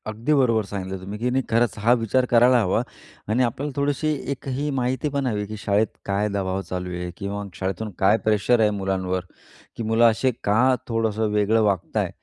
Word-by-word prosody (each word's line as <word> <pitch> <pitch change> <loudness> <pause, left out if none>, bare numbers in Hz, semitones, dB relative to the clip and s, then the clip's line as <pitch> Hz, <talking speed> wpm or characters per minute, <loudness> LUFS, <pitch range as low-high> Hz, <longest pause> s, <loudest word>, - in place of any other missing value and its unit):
अगदी 115 +7 -1
बरोबर 115 -7 +3
सांगितलं 95 -1 -5
तुम्ही, 100 +3 -6
की 125 +2 0
नाही 130 +1 0
खरंच 115 0 +1
हा 115 +3 +4
विचार 125 +2 +1
करायला 120 +1 +5
हवा 100 +2 +1 0.5
आणि 120 +4 +2
आपल्याला 135 +5 -2
थोडीशी 145 +2 0 0.2
एक 140 0 -6
ही 140 +3 -2
माहिती 130 +4 -1
पण 140 -1 -2
हवी 105 -3 -1
की 110 +1 -7
शाळेत 105 +1 +1 0.2
काय 100 +1 0
दबाव 95 -1 -2
चालू 90 0 -4
आहे? 90 0 -4
किंवा 100 0 -4
शाळेतून 95 +4 -3
काय 100 +3 +4
प्रेशर 110 +3 +2
आहे 110 -1 +4
मुलांवर, 95 -2 -2 0.5
की 115 - -4
मुलं 115 +2 +3
असे 130 +4 +1
का 125 +6 +3
थोडंसं 110 -1 0
वेगळं 105 +2 +2
वागत 100 -5 -1
आहे. - - +1
110 Hz, 190 wpm, -23 LUFS, 100-125 Hz, 0.5 s, करायला